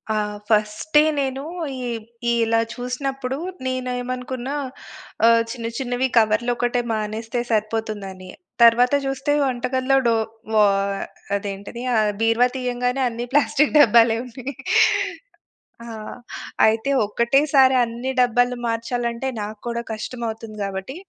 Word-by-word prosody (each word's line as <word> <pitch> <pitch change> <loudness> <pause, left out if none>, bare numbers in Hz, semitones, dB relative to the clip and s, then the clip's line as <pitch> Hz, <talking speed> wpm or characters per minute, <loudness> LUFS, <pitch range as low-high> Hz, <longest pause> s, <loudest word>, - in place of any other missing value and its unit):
ఆ! - - +1 0.3
ఫస్టె 215 +8 +3 0.2
నేను 270 0 -2 0.3
ఇ - - -6 0.7
ఇలా 225 0 +2 0.2
చూసినప్పుడు 260 +1 -3 0.3
నేనేమనుకున్న 255 0 -3 0.8
ఆహ్, 230 0 +6
చిన్న 230 -3 -5
చిన్నవి 250 -1 -1
కవర్లోకటే 240 +3 +2
మానేస్తే 220 +2 -3
సరిపోతుందని. 210 -4 -3 0.3
తరువాత 240 +3 +6
జూస్తే 270 +2 -1
వంటకల్లో 260 +1 +1
డో 230 - +3 0.4
వ - - +1 0.8
అదేంటది? 200 +3 -5
ఆహ్, 215 -1 +3
బీరువా 225 +2 +4
తీయంగానే 250 0 -1
అన్ని 235 +1 -5
ప్లాస్టిక్కు 295 0 +3
డబ్బాలే 230 -2 +5
ఉన్నాయి. 255 +3 -7 1.3
ఆ! - - -10 0.8
అయితే 220 +4 +1 0.2
ఒక్కటే 235 +6 +2
సారి 265 -1 +6
అన్ని 235 +3 -4
డబ్బాలు 245 0 +2
మార్చాలంటే 235 +2 -2
నాకు 210 +1 -6
కూడా 235 0 -3
కష్టమవుతుంది. 225 -1 -6
గాబట్టి 195 +6 -5
240 Hz, 105 wpm, -22 LUFS, 225-255 Hz, 1.3 s, ఆహ్